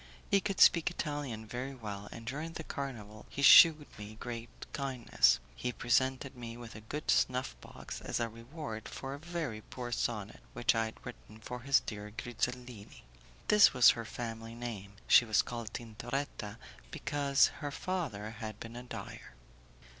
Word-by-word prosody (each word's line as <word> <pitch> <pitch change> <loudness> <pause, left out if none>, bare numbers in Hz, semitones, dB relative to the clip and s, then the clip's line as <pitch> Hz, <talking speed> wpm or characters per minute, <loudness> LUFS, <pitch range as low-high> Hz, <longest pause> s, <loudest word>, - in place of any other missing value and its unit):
He 200 - +5
could 195 -1 -2
speak 170 -1 +7
Italian 145 -9 -4
very 125 +5 -5
well, 105 -4 -7
and 115 - -9
during 150 +7 -4
the 160 - -6
carnival 110 -8 -6
he 140 - -4
shewed 155 0 +9
me 105 +1 -8
great 120 -1 -6 0.2
kindness. 135 -4 +2 0.2
He 125 - -2
presented 130 +3 +1
me 120 -1 -7
with 120 -2 -9
a 110 - -9
gold 145 +8 -2
snuffbox 125 - -1
as - - -2
a 115 - 0
reward 115 +1 -7
for 135 0 -6
a 140 - -7
very 155 -9 -4
poor 120 +2 -7
sonnet 110 -3 -2
which 120 - +2
I 115 -1 +1
had 110 - -9
written 115 -3 -10
for 125 +3 -6
his 135 +2 +3
dear 105 -1 -6
Grizellini. 120 -2 -4 0.4
This 210 -9 +7
was 125 - +8
her 115 - -4
family 115 0 -6
name; 110 -5 -6
she 120 - +8
was 110 -3 +3
called 115 -2 -6
Tintoretta 115 -1 -5 0.3
because 140 - +2
her 145 - -3
father 140 - -3
had 110 -1 -7
been 115 +1 -8
a 120 - -6
dyer. 125 - -9
120 Hz, 160 wpm, -33 LUFS, 110-140 Hz, 0.4 s, shewed